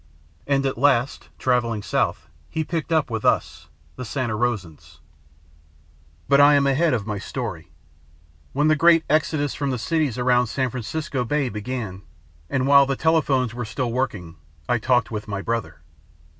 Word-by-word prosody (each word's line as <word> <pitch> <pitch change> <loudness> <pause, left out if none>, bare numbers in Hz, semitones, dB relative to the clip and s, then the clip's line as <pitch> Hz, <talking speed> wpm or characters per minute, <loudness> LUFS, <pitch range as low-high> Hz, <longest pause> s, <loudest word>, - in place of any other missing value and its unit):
And 140 -1 +1
at 130 -3 -2
last, 135 -2 +1
travelling 120 -4 0
south, 75 - -1 0.2
he 160 0 -2
picked 165 0 -4
up 155 -6 +1
with 110 -1 -3
us, 75 +1 0 0.3
the 130 - -5
Santa 120 -2 -2
Rosans. 85 -10 -3 1.3
"But 140 0 +5
I 145 +1 +7
am 140 -1 +3
ahead 140 +2 +2
of 105 -4 -3
my 105 -2 -3
story. 95 - -6 0.8
When 145 +3 +1
the 155 - +4
great 165 +1 +5
exodus 155 -2 +1
from 140 -1 -2
the 130 - -1
cities 150 0 -1
around 125 0 +2
San 130 +2 -1
Francisco 130 +2 -3
Bay 140 +1 0
began, 105 -3 -5 0.5
and 130 -1 0
while 140 0 +6
the 135 - 0
telephones 140 -6 +1
were 120 0 -4
still 120 +1 -3
working, 100 -10 -3 0.3
I 120 - +1
talked 125 +1 +1
with 105 -1 -5
my 100 -1 -4
brother. 100 -10 -3
125 Hz, 160 wpm, -23 LUFS, 110-140 Hz, 1.3 s, I